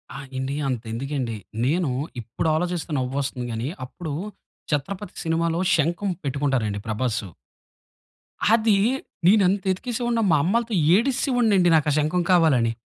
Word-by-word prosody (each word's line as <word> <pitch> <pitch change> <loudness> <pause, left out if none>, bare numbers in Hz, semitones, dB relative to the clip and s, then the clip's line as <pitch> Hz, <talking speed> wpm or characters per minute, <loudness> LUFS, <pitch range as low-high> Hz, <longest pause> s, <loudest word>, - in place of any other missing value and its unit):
ఆ! - - -5 0.2
ఎండీ. 130 +1 -2
అంతెందుకేండి. 125 0 -3 0.3
నేను 160 +2 +1 0.3
ఇప్పుడు 115 +8 -3
ఆలోచిస్తే 175 0 -2
నవ్వొస్తుంది 130 0 -2
గానీ 115 +2 -3 0.2
అప్పుడు 160 +3 -7 0.6
'చత్రపతి' 180 +7 -3
సినిమాలో 165 0 0 0.2
శంకం 170 +6 0
పెట్టుకుంటారండి 135 -7 -1
ప్రభాసు. 110 -1 -1 1.3
అది 220 -2 +4 0.5
నేనెంత 195 -1 +4
యెతికేసే 235 +6 -3
వాడినో 235 -1 +1
మా 155 - +5
అమ్మలాతో 230 +5 0 0.2
ఏడిస్సే 265 +5 +1
వోడినండి 205 -7 +4
నాకా 150 -1 +1
శంఖం 155 +4 +1
కావాలని. 145 -10 +4
160 Hz, 115 wpm, -24 LUFS, 130-190 Hz, 1.3 s, మా